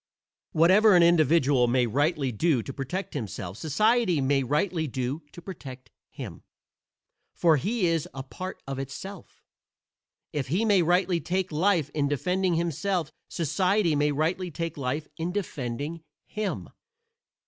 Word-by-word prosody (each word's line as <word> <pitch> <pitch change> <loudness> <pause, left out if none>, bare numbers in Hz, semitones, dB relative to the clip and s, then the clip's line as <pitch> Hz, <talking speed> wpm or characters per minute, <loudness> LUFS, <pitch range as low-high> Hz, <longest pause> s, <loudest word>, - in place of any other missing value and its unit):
Whatever 190 +6 +6
an 175 - +7
individual 155 -6 +4
may 125 +1 +3
rightly 145 +3 0
do 130 +1 +1
to 135 - -7
protect 160 +9 -4
himself 100 -7 -5
society 210 - +2
may 135 0 +2
rightly 155 +5 0
do 130 +4 -3
to 175 - -12
protect 135 -9 -9 0.2
him, - - -8 0.9
for 165 -3 +4
he 205 - 0
is 165 -3 +1
a 135 - -6
part 185 +7 -7
of 135 -1 -4
itself. 160 +8 -8 0.9
If 140 -3 -2
he 180 - +1
may 205 -4 +4
rightly 175 0 +2
take 185 0 -1
life 160 -2 +1
in 145 -2 +1
defending 180 +5 0
himself 170 0 -1 0.2
society 180 +2 +1
may 145 0 +2
rightly 165 +5 -1
take 165 +1 -4
life 145 +2 -3
in 165 +2 -2
defending 150 - -4 0.2
him. 215 -2 -4
160 Hz, 135 wpm, -27 LUFS, 140-185 Hz, 0.9 s, an